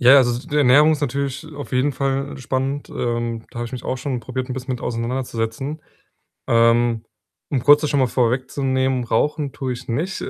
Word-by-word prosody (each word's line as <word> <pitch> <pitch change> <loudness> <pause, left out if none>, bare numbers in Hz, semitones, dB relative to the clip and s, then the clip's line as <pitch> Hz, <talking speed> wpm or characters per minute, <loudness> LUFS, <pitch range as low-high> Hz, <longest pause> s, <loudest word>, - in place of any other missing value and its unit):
Ja, 125 +3 +8
also, 120 -2 +2
d 125 - -12
die 150 - 0
Ernährung 145 +3 +6
ist 155 - -2
natürlich 140 +1 -2
auf 145 -1 -8
jeden 130 +3 +2
Fall 135 +1 -2
spannend. 135 +2 -2
Ähm, 120 -1 -2
da 120 - -6
habe - - -2
ich 120 - -11
mich 130 - -5
auch 130 - -1
schon 130 -1 -3
probiert, 130 +2 -4
'n - - -3
bisschen 130 +1 -4
mit 125 - -8
auseinanderzusetzen. 120 +3 -3 0.7
Ähm, 115 0 +3 0.4
um 135 -4 -1
kurz 145 0 +8
das 150 - -1
schon 145 - +2
mal 130 - +4
vorwegzunehmen, 130 +1 0
rauchen 145 +5 0
tue 130 -2 -3
ich 125 +1 -8
nicht. 160 +11 -2
130 Hz, 200 wpm, -21 LUFS, 120-140 Hz, 0.7 s, Ja